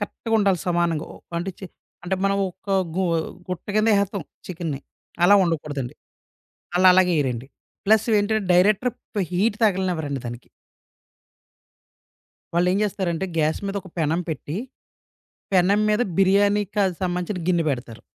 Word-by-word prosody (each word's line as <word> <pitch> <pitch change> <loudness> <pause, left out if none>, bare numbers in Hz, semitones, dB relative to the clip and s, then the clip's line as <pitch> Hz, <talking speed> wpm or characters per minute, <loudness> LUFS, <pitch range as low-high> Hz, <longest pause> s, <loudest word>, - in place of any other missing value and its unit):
కరెక్ట్‌గా 225 +2 -5
ఉండాలి 195 -3 +2
సమానంగా. 170 -3 0
ఓ - - -12 0.2
అంటే 180 +3 -3
చే 190 - -7 0.4
అంటే 185 +2 0
మనం 195 0 +2
ఒక 190 +3 -11 0.3
గు 190 - +1 0.5
గుట్ట 180 -1 -5
కింద 215 +1 +3
ఏహెతాం 200 -1 0 0.2
చికెన్ని. 165 -6 -4 0.4
అలా 200 - +7
ఉండకూడదండి. 145 -6 -3 0.8
అళ్ళ 185 +1 +4
అలాగేయరండి. 145 -10 +2 0.4
ప్లస్ 215 +1 +4
ఏంటంటే, 210 +1 +1
డైరెక్టర్ 205 +7 +4 0.4
హీట్ 205 +4 +1
తాగలేనేవరండి 180 -8 0
దానికి. 120 +1 -8 2.1
వాళ్ళేం 180 +2 +2
చేస్తారంటే 190 -3 -2
గ్యాస్ 155 0 +1
మీద 195 +1 -3
ఒక 185 - -12
పెనం 160 +2 +1
పెట్టి, 155 +1 -4 1.0
పెనం 190 +3 +4
మీద 210 +2 +2 0.2
బిర్యానీ 200 +2 +4
కాని 195 -3 +2
సంబంధించిన 180 0 -2
గిన్నె 175 -2 +2
పెడతారు. 120 -4 -5
180 Hz, 125 wpm, -23 LUFS, 165-200 Hz, 2.1 s, అలా